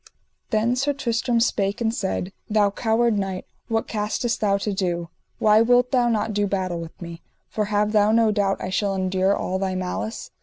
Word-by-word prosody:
Then 225 +3 +1
Sir 280 +3 0
Tristram 235 -2 0
spake 205 -4 0
and 225 -1 0
said: 190 -3 -3 0.2
Thou 210 -2 +3
coward 225 0 +1
knight, 190 -2 -3 0.2
what 225 -1 -1
castest 215 +2 -1
thou 200 -2 +2
to 200 +1 -2
do; 175 -3 -2 0.3
why 215 0 +5
wilt 245 +2 +3
thou 245 -2 +3
not 220 -1 0
do 205 0 +1
battle 185 -3 -2
with 165 -1 -9
me? 170 -1 -8 0.3
for 215 - -1
have 210 0 +1
thou 210 -1 +4
no 225 -1 +4
doubt 200 -2 +1
I 185 - -4
shall 195 +1 0
endure 190 +1 +1
all 190 +1 -2
thy 190 -1 -1
malice. 185 +4 -4
210 Hz, 190 wpm, -23 LUFS, 190-225 Hz, 0.3 s, why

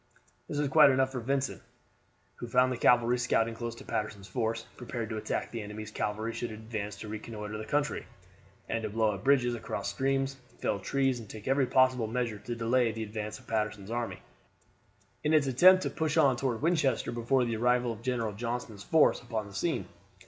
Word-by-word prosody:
This 145 - -3
was 145 0 +1
quite 150 +1 +7
enough 130 0 +2
for 130 - -3
Vincent, 135 +2 -1 0.8
who 120 - -6
found 125 +2 +3
the 125 - -2
cavalry 120 +1 +4
scouting 115 -1 +1
close 115 0 -5
to - - -12
Patterson's 105 -2 -3
force, 115 -1 -2
prepared 120 -2 -5
to 110 - -2
attack 105 - -3
the 115 - -4
enemy's 105 +1 -7
cavalry 110 +2 -2
should 120 - -3
it 110 - -7
advance 110 -2 -5
to 110 - -8
reconnoiter 105 0 -6
the 110 - -5
country, 145 +5 -1 0.6
and 115 - -1
to 110 - -3
blow 110 0 +2
up 100 -1 -8
bridges 130 -3 +3
across 115 - -4
streams, 135 0 0 0.2
fell - - -1
trees, 135 +4 0
and 110 -3 -10
take 110 +2 -9
every 135 0 +3
possible 130 -3 +3
measure 115 -2 -2
to 120 +3 -5
delay 115 +1 +2
the 110 0 -4
advance 105 0 -5
of - - -18
Patterson's 105 -2 -2
army, 115 -6 -3 1.0
in 155 +1 +3
its 150 -2 +4
attempt 185 +9 +6
to - - -2
push 160 -2 -1
on 135 -3 +5
toward 125 0 -2
Winchester 150 -8 +1
before 120 +2 +1
the 115 -2 -2
arrival 125 +1 +2
of 110 - -11
General 115 -3 -1
Johnston's 115 -1 -4
force 160 +7 +4
upon 115 -3 -3
the 100 - -12
scene. 150 - -1
120 Hz, 200 wpm, -30 LUFS, 110-130 Hz, 1.0 s, quite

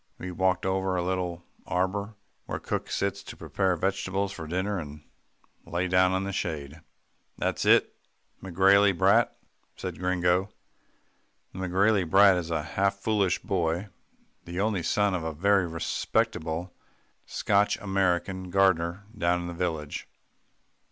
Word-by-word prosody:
We 90 - -6
walked 95 0 +1
over 95 0 0
to 90 - 0
a - - -4
little 90 -2 -2 0.2
arbour 100 +4 -1 0.3
where - - -3
cook - - -4
sits 100 0 -1
to - - -10
prepare 95 -2 0
vegetables 95 +2 -1
for 80 -5 -7
dinner, 95 +4 -1
and 75 -1 -9 0.6
lay 90 +2 -2
down 90 0 +4
in 95 +1 0
the 100 0 -4
shade. 80 -3 -4 0.6
"It's - - -1
that - - +4 0.5
McGrailey 95 +1 +4
brat," 100 +6 +3 0.4
said - - -6
Gringo. 90 +1 +1 1.0
The 95 - -8
McGrailey 95 0 +2
brat 100 +1 +7
is 85 -2 -3
a 80 -2 -1
half 100 +5 0
foolish 100 -2 0
boy, 90 +1 -1 0.6
the 85 +2 -5
only 100 -2 +1
son 100 +4 +1
of 90 -3 -2
a 80 0 -3
very 95 +3 +2
respectable, 80 +1 -2 0.5
Scotch 100 0 +1
American 95 -1 -1
gardener 95 0 +2
down 90 -2 +1
in - - -5
the 85 - -5
village. 80 -4 -3
95 Hz, 140 wpm, -27 LUFS, 85-100 Hz, 1.0 s, brat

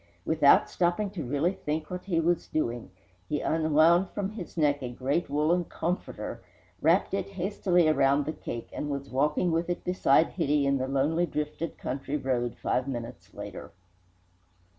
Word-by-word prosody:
Without 150 -3 +5
stopping 180 +3 0
to 180 -6 -5
really 145 +8 0
think 155 -2 -4
what 180 0 -5
he 175 -4 +1
was 170 +1 +1
doing, 120 -8 -2 0.4
he 150 - 0
unwound 160 +3 +3
from 200 -1 -3
his 190 -5 -8
neck 145 -2 +2
his 125 -2 -6
great 140 +6 0
woollen 155 +5 +2
"comforter," 175 +3 -4 0.4
wrapped 170 +6 +3
it 195 -1 -1
hastily 185 -2 +1
around 140 -2 +3
the 155 - -2
cake, 120 -6 -6
and 150 - -4
was 140 -1 -4
walking 150 +6 +1
with 165 +2 0
it 175 - -2
beside 165 -4 +3
Hitty 150 -4 +1
in 140 0 +2
the 130 - -1
lonely, 150 +6 +1
drifted 150 +2 -4
country 140 +2 -3
road 125 -4 -1
five 130 +1 -1
minutes 115 -8 -6
later. 105 0 -8
155 Hz, 160 wpm, -28 LUFS, 140-175 Hz, 0.4 s, Without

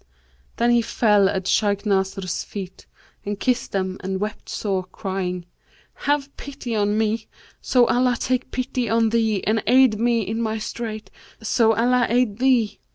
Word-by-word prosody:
Then 235 +1 +2
he 240 0 +4
fell 210 -4 +3
at 190 -2 -2
Shaykh 205 0 +1
Nasr's 190 -2 -1
feet 190 -3 -8 0.4
and 205 0 -4
kissed 250 +2 0
them 190 -1 -2
and 190 0 -2
wept 210 +2 -5
sore, 190 -3 -2
crying, 185 -2 -4 0.5
'Have 285 -1 -1
pity 270 -4 -6
on 205 0 +1
me, 220 0 0 0.3
so 250 -2 +3
Allah 250 0 +2
take 255 0 -1
pity 255 -2 -2
on 225 0 +3
thee 220 -3 +1
and 220 +1 +1
aid 250 -3 +5
me 235 0 +2
in 220 +3 -3
my 220 -1 -1
strait 215 -2 -6 0.3
so 225 0 +3
Allah 245 +2 +2
aid 240 -3 +1
thee!' 245 -6 +2
220 Hz, 160 wpm, -22 LUFS, 200-240 Hz, 0.5 s, aid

